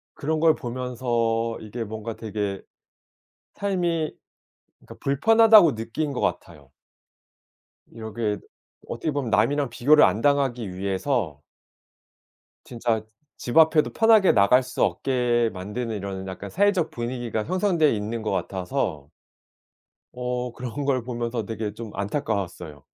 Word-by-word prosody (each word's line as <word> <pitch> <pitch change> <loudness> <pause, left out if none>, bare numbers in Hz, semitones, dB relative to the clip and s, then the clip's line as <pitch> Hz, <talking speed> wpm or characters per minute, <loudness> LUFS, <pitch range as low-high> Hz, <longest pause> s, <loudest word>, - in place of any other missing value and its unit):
그런 155 +2 -1
걸 160 -1 +4
보면서 120 -2 -2
이게 110 +2 -5
뭔가 110 +1 -6
되게 105 -3 -4 0.9
삶이 175 -5 -1 0.7
그러니까 - - -14
불편하다고 215 - +6
느낀 115 +7 -3
것 - - -3
같아요. - - -4 1.2
이렇게 110 -1 -4 0.5
어떻게 155 - -3
보면 140 -4 -2
남이랑 140 +6 +2
비교를 145 +6 +5
안 110 - +3
당하기 130 -8 +1
위해서 95 - -2 1.2
진짜 115 -2 -1 0.4
집 120 - -3
앞에도 160 -1 +5
편하게 225 -4 +5
나갈 115 +5 +5
수 - - -2
없게 120 -3 +1
만드는 105 +5 -4
이러는 95 -1 -5
약간 95 +2 -7
사회적 200 - +1
분위기가 120 -2 -3
형성돼 175 - +2
있는 110 +2 -4
것 110 - -2
같아서 90 - -3 1.0
어 125 0 -3
그런 125 +4 -5
걸 130 -3 +1
보면서 120 -2 -3
되게 110 -1 -4
좀 110 0 -8
안타까웠어요. 100 - -3
120 Hz, 270 characters per minute, -24 LUFS, 110-145 Hz, 1.2 s, 불편하다고